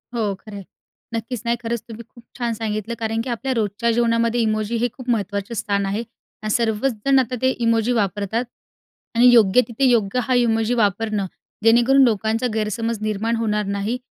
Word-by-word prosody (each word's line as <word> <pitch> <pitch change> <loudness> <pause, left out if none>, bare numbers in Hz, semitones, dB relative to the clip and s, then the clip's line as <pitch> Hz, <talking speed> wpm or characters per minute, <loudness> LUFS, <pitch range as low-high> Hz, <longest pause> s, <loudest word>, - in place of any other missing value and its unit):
हो 215 -4 0
खरं 205 +2 -12
आहे. 200 - -7 0.5
नक्कीच. 230 +1 -4
नाही, 235 0 +1
खरंच 235 -1 -3
तुम्ही 225 +1 -8
खूप 235 - -17
छान 235 -2 -1
सांगितलं 215 0 -3
कारण 225 0 -1
की 255 - -5
आपल्या 250 +3 -2
रोजच्या 225 0 0
जेवणामध्ये 230 0 +1
इमोजी 215 0 0
हे 240 +2 +1
खूप 255 -2 -9
महत्त्वाचं 205 -1 -1
स्थान 200 -3 -1
आहे, 205 +4 -2 0.4
आणि 215 - -2
सर्वच 230 +3 +1
जण 275 -1 +5
आता 250 -1 -1
ते 260 - +3 0.2
इमोजी 230 +1 +2
वापरतात, 205 +2 -1 0.7
आणि 240 +2 +6
योग्य 225 0 +6
तिथे, 240 +3 0
योग्य 230 -1 +2
हा 255 - 0
इमोजी 225 -1 +2
वापरणं, 210 -2 0 0.4
जेणेकरून 240 +4 +5
लोकांचा 225 +1 +1
गैरसमज 220 +1 -2
निर्माण 215 +2 -1
होणार 210 -2 -1
नाही, 200 +5 -2
225 Hz, 175 wpm, -21 LUFS, 210-235 Hz, 0.7 s, आणि